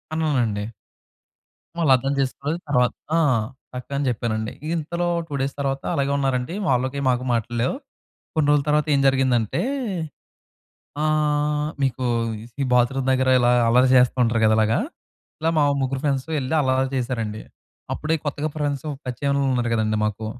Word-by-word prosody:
అన్నానండి. 125 -10 0 1.1
వాళ్ళర్థం 135 -4 +3
చేసుకోలేదు. 140 +4 -2
తర్వాత 125 -3 +3 0.2
ఆహ్, 130 -9 +3 0.3
చక్కగానే 140 +3 -3
చెప్పానండి. 110 -1 -2 0.2
ఇంతలో 170 +2 -2 0.2
2 145 - -6
డేస్ 135 +1 -1
తర్వాత 135 -1 -1
అలాగే 140 0 0
ఉన్నారండి. 135 +2 -1
వాళ్ళకి 130 +2 0
మాకు 125 0 +1
మాటల్లేవు. 120 - -1 0.6
కొన్ని 155 -3 +2
రోజుల 145 -1 +3
తర్వాత 150 +1 +2
ఏం 140 - +3
జరిగిందంటే 130 -5 +1 1.4
ఆహ్, 150 -1 +1
మీకు 130 -1 0 0.6
ఈ - - +1
బాత్రూమ్ 125 +2 +2
దగ్గర 130 0 +1
ఇలా 120 -1 +3 0.2
అల్లరి 125 +3 +5
చేస్తూ 125 0 +4
ఉంటారు 115 0 +1
కదా! 110 0 +5
ఇలాగా. 110 +1 +3 0.7
ఇలా 160 - +2
మా 150 - +4 0.2
ముగ్గురు 135 0 -1
ఫ్రెండ్స్ 135 -3 0
వెళ్లి 130 +2 -2
అలా 130 -2 +1 0.2
చేశారండి. 115 -4 -2 0.5
అప్పుడే 155 +1 -1
కొత్తగా 145 +1 -2
ఫ్రెండ్స్ 145 -2 -2 0.2
పరిచయం 130 +3 -2
అయిన 140 - +1
వాళ్ళు 135 -1 +1
ఉన్నారు 120 -1 0
గదండీ 110 -1 +1
మాకు 105 +1 -3
130 Hz, 140 wpm, -23 LUFS, 120-145 Hz, 1.4 s, అల్లరి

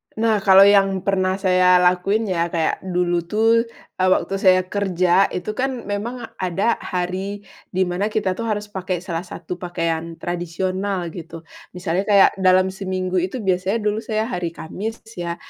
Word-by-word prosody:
Nah, 220 -1 +2
kalau 195 -1 +6
yang 195 -2 +4
pernah 190 -1 +1
saya 185 -2 +4
lakukin 180 +4 +2
ya 170 -1 +1
kayak, 165 -2 -1
dulu 175 -1 0
tuh, 225 +3 +2 0.3
eee, 185 - +3
waktu 190 +1 +1
saya 185 -1 +5
kerja, 185 -1 +2
itu 180 +4 -4
kan 255 +1 -3
memang 220 +5 -4 0.2
ada 190 +5 0
hari 190 +3 -4 0.2
di 185 0 0
mana 180 +3 -1
kita 210 -3 -1
tuh 230 0 -3
harus 210 -1 -3
pakai 185 -2 -3
salah 175 -1 -4
satu 175 +1 -7
pakaian 165 -2 -3
tradisional 180 +2 -3
gitu, 165 -1 -9 0.3
misalnya 180 +2 -2
kayak 200 -2 +6
dalam 185 0 +4
seminggu 185 -1 -2
itu 190 +6 -3
biasanya 190 +4 0
dulu 210 +1 0
saya 215 -1 -2
hari 175 -7 -4
Kamis 215 +7 -6 0.2
ya. 170 0 -3
185 Hz, 160 wpm, -21 LUFS, 180-205 Hz, 0.3 s, kalau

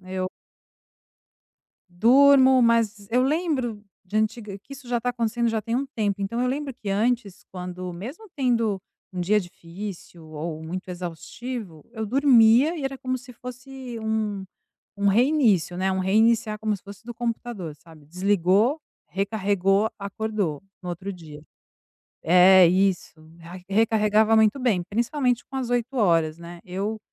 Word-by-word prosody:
Eu 185 0 -4 1.6
Durmo, 260 +6 +6
mas 225 -4 +1
eu 250 +2 +3
lembro 270 - -1 0.2
de 190 +3 -5
antiga 215 -2 -2
que 215 +7 -15
isso 270 -2 -14
já 240 -1 0
tá 250 - -2
acontecendo 235 0 -1
já 225 -1 -1
tem 230 0 -3
um 270 +3 0
tempo, 205 -6 -2
então 200 +4 -3
eu 250 - +1
lembro 275 +2 -2
que, 220 -4 -8
antes, 225 0 -1
quando 180 0 -6
mesmo 265 - -9
tendo 230 -7 +1 0.3
um 180 - -4
dia 210 +4 +2
difícil 175 -1 -9
ou 155 +1 -6
muito 185 +4 -6
exaustivo, 180 - -7
eu 220 -2 -4
dormia 255 +4 +5
e 285 - -5
era 270 0 -3
como 255 0 -2
se 250 0 -12
fosse 250 0 -9
um 215 -3 -2 0.6
um 200 - +3
reinício, 220 - +3
né, 190 +1 0
um 190 - -1
reiniciar, 215 +2 +2
como 215 -1 -1
se 195 - -14
fosse 200 +2 -12
do 240 - -7
computador, 230 -7 -4
sabe: 160 -1 -18
desligou, 195 - +1 0.3
recarregou, 200 +1 +1
acordou 200 -5 -3 0.2
no 180 - -6
outro 180 +3 -5
dia. 155 -5 -11 0.8
É, 180 +1 +7
isso, 185 -2 0 0.2
ai, 175 +2 -11
recarregava 215 +1 +3
muito 220 +4 +3
bem, 225 -8 +1
principalmente 240 - -1
com 270 - -11
as 260 -2 -3
8 245 +2 -1
horas, 165 -7 +2
né. 170 0 -10
Eu 200 +4 -3
215 Hz, 150 wpm, -24 LUFS, 185-245 Hz, 1.6 s, É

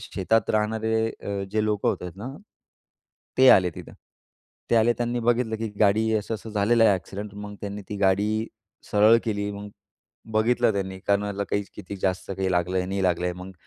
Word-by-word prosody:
शेतात 110 0 0
राहणारे 110 +1 +1
अ, 100 -3 -5
जे 110 0 +1
लोकं 105 -1 0
होते 90 -1 -2
ना, 115 +6 -6 1.1
ते 130 0 +7
आले 90 -1 +5
तिथं. - - -10 0.8
ते 115 - +4
आले 115 +1 +4
त्यांनी 120 0 -1
बघितलं, 115 -1 +1
की 110 0 -3
गाडी 110 +2 +3
असं 105 +2 -3
असं 110 +1 -8
झालेलं 110 +2 +3
आहे 105 - +6
ॲक्सिडेंट. 100 +3 -7
मग 105 0 -8
त्यांनी 100 0 -6
ती 105 - -4
गाडी 105 +3 +1 0.4
सरळ 105 +2 +6
केली. 105 -2 -2
मग 100 0 -7 0.6
बघितलं 115 +1 +2
त्यांनी 95 -1 -3
कोणाला 100 0 0
काही 100 - +1
किती 100 +2 -8
जास्त 95 0 -1
काही 95 0 -2
लागलं 90 +1 0
आहे, 90 - -1
नाही 95 0 -2
लागलं 90 -1 +1
आहे. 90 - -1
मग, 90 +1 -9
105 Hz, 180 wpm, -25 LUFS, 95-110 Hz, 1.1 s, ते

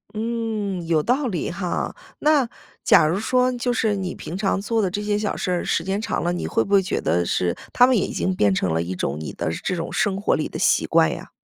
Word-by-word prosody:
嗯， 215 -5 -2
有 160 -3 +2
道 260 - +1
理 180 -8 -2
哈。 180 0 -3 0.2
那 295 -5 +3 0.3
假 - - +6
如 165 +5 +1
说 255 +3 +2
就 245 0 -1
是 220 -3 +1
你 190 -2 -4
平 165 - -7
常 195 0 0
做 225 +3 0
的 195 - +1
这 205 +3 -3
些 210 0 0
小 210 -1 -2
事 185 - -2
儿 180 - 0
时 165 - 0
间 195 +3 -2
长 - - -2
了， 175 - 0
你 175 - -3
会 - - +1
不 200 - -4
会 200 - +6
觉 190 - -2
得 85 +3 +1
是 85 0 0 0.2
它 245 - +7
们 255 0 +3
已 205 - +1
经 185 - -1
变 100 - +3
成 90 -3 0
了 80 - +1
一 90 +2 -4
种 75 -4 -2
你 80 - -5
的 80 - -2
这 185 - -1
种 165 -1 -4
生 200 -2 0
活 205 - +2
里 - - -2
的 - - -6
习 - - +2
惯 - - +4
呀？ - - -9
195 Hz, 275 characters per minute, -23 LUFS, 170-225 Hz, 0.3 s, 它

